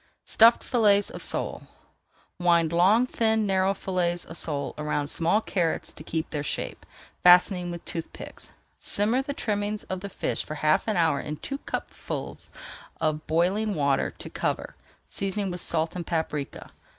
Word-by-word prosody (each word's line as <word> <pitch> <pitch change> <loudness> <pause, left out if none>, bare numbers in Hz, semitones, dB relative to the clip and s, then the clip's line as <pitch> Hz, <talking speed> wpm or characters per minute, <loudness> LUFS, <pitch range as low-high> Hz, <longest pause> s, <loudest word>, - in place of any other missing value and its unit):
STUFFED 230 +1 +6
FILLETS 205 -5 +3
OF - - -8
SOLE - - -1 0.7
Wind 170 -2 +3
long, 195 +8 +5
thin, 220 -3 +1
narrow 190 0 +2
fillets 175 -2 -1
of 165 - -9
sole 145 -4 -2
around 150 -1 -1
small 170 +6 +1
carrots 175 -6 -1
to - - -11
keep 160 0 -3
their 150 - -2
shape, 145 - -4 0.3
fastening 180 0 +6
with 170 -1 -7
tooth 165 -1 -4
picks. - - -10 0.3
Simmer 220 +6 +1
the 285 +1 -5
trimmings 210 -2 -2
of 185 - -2
the 200 +2 -6
fish - - -2
for 155 - -6
half 155 +5 +2
an 215 -3 +1
hour 160 -4 +3
in 150 0 -5
two 275 - -5
cupfuls - - -5 0.5
of 155 -1 -1
boiling 190 +6 +1
water 140 -2 +1
to - - -8
cover, - - -3 0.3
seasoning 195 0 -2
with 175 0 -3
salt 160 0 0
and 175 -2 -5
paprika. 155 -4 -3
180 Hz, 160 wpm, -26 LUFS, 160-205 Hz, 0.7 s, STUFFED